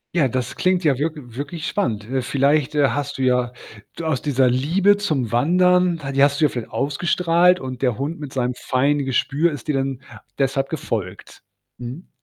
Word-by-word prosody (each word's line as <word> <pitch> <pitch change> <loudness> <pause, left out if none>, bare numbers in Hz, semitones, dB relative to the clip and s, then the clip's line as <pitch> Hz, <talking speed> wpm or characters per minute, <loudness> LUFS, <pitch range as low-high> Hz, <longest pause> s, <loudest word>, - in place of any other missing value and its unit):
Ja, 155 -6 +3
das 125 0 -3
klingt 185 0 +1
ja 145 -5 +2
wirk 155 +3 -1
wirklich 140 +4 -7
spannend. 110 - -1
Äh, 130 +4 -2
vielleicht, 140 +3 +1
äh, 145 -3 +4
hast 145 +2 -3
du - - -4
ja 125 -1 +1 0.4
d 170 - -5
aus 155 -6 -1
dieser 130 -3 +2
Liebe 180 +11 +3
zum 145 - -1
Wandern, 180 +5 +3
die 135 - +2
hast 140 +1 +3
du 155 - +6
ja - - +3
vielleicht 120 -3 -6
ausgestrahlt 170 +5 +2
und 130 -1 -6
der 125 -5 +1
Hund 150 +6 -4
mit 145 -3 -8
seinem 125 -1 -1
feinen 140 +3 0
Gespür 145 +5 +1
ist 145 +2 -8
dir 150 - +1
dann 135 -1 -2 0.4
deshalb 135 0 0
gefolgt. 110 - -5 0.3
Mhm. 125 +8 -8
140 Hz, 185 wpm, -21 LUFS, 125-160 Hz, 0.4 s, du